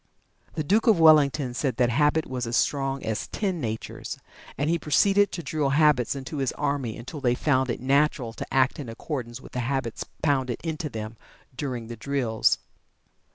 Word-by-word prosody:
The 155 - -1
Duke 210 - +2
of 215 -6 +5
Wellington 150 -4 +5
said 125 -1 -1
that 120 -1 +3
habit 150 +4 +2
was 125 -2 -4
as 120 - 0
strong 135 -1 0
as 110 -1 -2
ten 190 -6 -2
natures, 110 -2 -5 0.4
and 145 - 0
he 170 +1 +1
proceeded 200 +7 +3
to 170 - -5
drill 150 -3 0
habits 145 -4 +3
into 135 +3 -6
his 135 -2 0
army 140 -6 -2
until 130 +5 -8
they 125 -2 +2
found 130 -2 +1
it 120 - -2
natural 135 -2 +1
to - - -7
act 130 +1 +2
in 135 -5 -6
accordance 120 0 -5
with - - -13
the 125 - -3
habits 125 -1 -2 0.2
pounded 130 -5 +1
into 160 -2 -3
them 110 -1 -6 0.4
during 125 -4 -4
the 120 +1 -8
drills. 120 -2 +1
135 Hz, 180 wpm, -26 LUFS, 120-150 Hz, 0.4 s, of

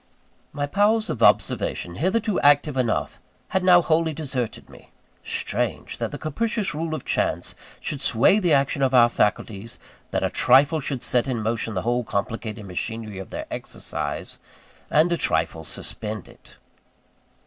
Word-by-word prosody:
My 145 0 -2
powers 210 +7 +2
of 120 - -5
observation, 85 - +2
hitherto 205 +4 +1
active 145 0 +4
enough, 125 -3 -1 0.3
had 190 - 0
now 180 -1 +6
wholly 160 0 +2
deserted 130 -6 -4
me. - - -16 0.3
Strange! - - -3
that - - -1
the - - -6
capricious 210 +4 -2
rule 160 +1 -2
of - - -7
chance - - -1 0.3
should 140 -3 -4
sway 130 - +4
the 180 -5 +1
action 140 0 +2
of 130 -1 +2
our 120 -1 +7
faculties 105 0 -1 0.3
that - - -1
a - - +1
trifle 145 +4 +4
should 135 -3 -4
set 125 0 +1
in 120 -4 -2
motion 115 0 -2
the 95 - -1
whole 120 +1 +1
complicated 110 0 -4
machinery 105 +2 -5
of 95 - -8
their - - -5
exercise, - - -5 0.5
and 160 +3 +3
a 170 - +2
trifle 80 - 0
suspend 105 +5 -5
it. - - -17
135 Hz, 155 wpm, -24 LUFS, 115-160 Hz, 0.5 s, our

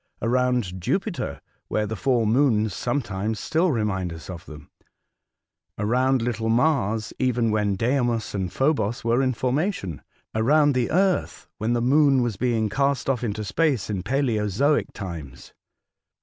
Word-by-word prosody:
Around 120 -6 0
Jupiter, 170 - -2 0.3
where 105 - 0
the 110 +1 -4
four 120 0 +1
moons 110 -3 +2
sometimes 110 -3 -2
still 165 - +1
remind 100 - -1
us 80 +3 -8
of 85 -3 -10
them; 75 -2 -12 1.1
around 125 +4 +1
little 115 -2 -1
Mars, 115 -4 +1
even 125 -3 +1
when 105 -2 +1
Deimos 120 +1 0
and 95 -4 -2
Phobos 135 -6 0
were 115 +3 +2
in 130 -1 +1
formation; 130 - -1 0.3
around 145 +6 +3
the 125 -2 0
Earth, 185 +2 +1
when 110 +2 0
the 120 -1 0
Moon 135 0 +4
was 120 -4 -1
being 115 0 0
cast 140 +4 0
off 125 -2 -3
into 110 -2 -2
space 125 +1 0
in 95 -3 -2
palaeozoic 120 +3 +1
times. 85 - -8
115 Hz, 140 wpm, -24 LUFS, 105-135 Hz, 1.1 s, Moon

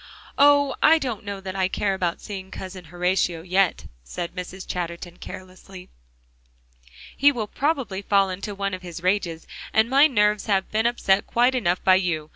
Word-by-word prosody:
"Oh! 285 -1 +5
I 325 - +6
don't 250 -9 -4
know 200 -1 -5
that 190 0 -6
I 190 -1 +1
care 195 +1 -1
about 180 -3 -2
seeing 190 -2 -7
Cousin 185 -2 -8
Horatio 175 0 -1
yet," 185 0 +1 0.2
said 170 - -6
Mrs. 185 +1 -7
Chatterton 175 0 -5
carelessly. 185 0 -11 1.3
"He 285 +1 +5
will 235 -6 -3
probably 265 -6 -2
fall 195 -1 +2
into 195 +2 -6
one 200 0 -2
of 185 - -5
his 175 -1 -9
rages, 180 -4 -1 0.3
and 220 +3 +2
my 280 +3 +6
nerves 210 -6 +1
have 195 -2 0
been 220 +2 +2
upset 200 -5 +1
quite 245 +2 +3
enough 180 -8 0
by 185 0 +6
you. 165 -5 -2
195 Hz, 170 wpm, -24 LUFS, 180-215 Hz, 1.3 s, I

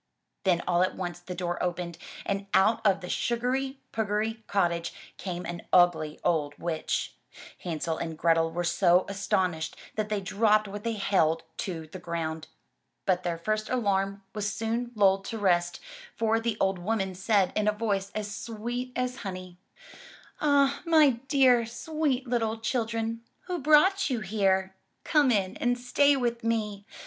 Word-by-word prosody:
Then 175 -2 +3
all 175 -1 +3
at 185 - +1
once 175 -2 -4
the 180 +1 -7
door 175 -1 -3
opened, 175 -1 -3 0.3
and 200 0 -2
out 220 +4 +4
of 195 -2 +3
the 180 - -6
sugary 255 +6 -1
pugary 220 +1 -1
cottage, 170 -4 0 0.2
came 180 -2 -5
an 170 0 -5
ugly 160 -4 +3
old 150 -4 0
witch. 165 -2 -2 0.5
Hansel 165 -1 -3
and 165 -1 -4
Grethel 165 0 +3
were 175 +2 -3
so 175 +1 +3
astonislied 185 -4 -1 0.2
that 215 -1 -2
they 210 -1 0
dropped 210 +2 +2
what 205 +1 -7
they 230 - -1
held 165 -6 +1
to 165 -4 -4
the 170 +4 -9
ground. 165 -2 -4 0.6
But 185 -2 +2
their 175 -2 -2
first 215 +5 -2
alarm 200 -4 0
was 210 -1 -2
soon 230 +3 -2
lulled 195 -2 +4
to 225 - -4
rest, 175 -3 +1 0.4
for 225 0 +2
the 225 -1 -2
old 190 -1 +1
woman 195 0 -1
said 195 0 +2
in 215 0 +1
a - - +5
voice 205 -3 -1
as 210 -1 -3
sweet 240 +3 -5
as 250 0 -1
honey: 185 -3 -7 0.8
Ah, 280 -2 +3
my 315 -4 +6 0.2
dear, 260 -4 +5
sweet 270 +1 -1
little 230 -2 0
children, 225 0 -2 0.2
who 360 -1 -4
brought 310 +7 +4
you 245 -4 -1
here? 190 -2 +1 0.3
Come 295 -4 +3
in 195 -5 +1
and 245 0 +1
stay 280 +4 +3
with 235 -3 -1
me! 210 -3 -1
205 Hz, 155 wpm, -28 LUFS, 180-230 Hz, 0.8 s, my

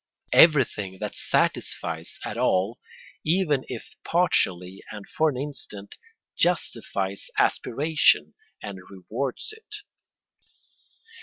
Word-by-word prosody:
Everything 120 - +5
that - - -5
satisfies 80 -1 -1
at - - -4
all, 95 +5 +1 0.4
even 155 -5 +2
if - - -8
partially 95 - 0
and 105 -2 -9
for 160 0 +2
an 135 - -4
instant, 125 -8 -6 0.4
justifies 105 - +1
aspiration 150 +5 +2 0.3
and 100 -3 -6
rewards 120 - -4
it. 440 -1 -11
115 Hz, 90 wpm, -25 LUFS, 95-155 Hz, 0.4 s, Everything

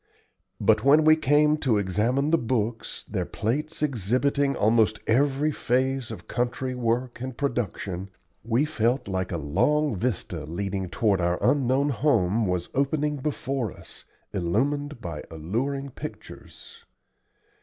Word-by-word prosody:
But 110 0 +3
when 150 +3 +6
we 155 0 +8
came 150 0 +3
to 130 -7 +1
examine 115 - +1
the 165 - +4
books, 115 -1 -2
their - - -2
plates 150 +8 -2
exhibiting 140 +3 +1
almost 110 0 +3
every 140 +5 +2
phase 130 -1 0
of - - -9
country 125 +1 -2
work 120 0 -1
and 130 -1 -5
production, 100 -8 -3 0.3
we 120 +6 +2
felt 125 -5 0
like 95 -2 -2
a 85 - -1
long 130 - +1
vista 95 -6 -2
leading 95 +3 -3
toward 100 -1 +1
our 85 +1 +1
unknown 140 0 +2
home 115 -7 +2
was 90 -1 -2
opening 145 +2 0
before 135 -5 -2
us, - - -13 0.3
illumined 130 - -1
by 80 -4 -5
alluring 130 - -3
pictures. - - -10
125 Hz, 130 wpm, -26 LUFS, 100-140 Hz, 0.3 s, we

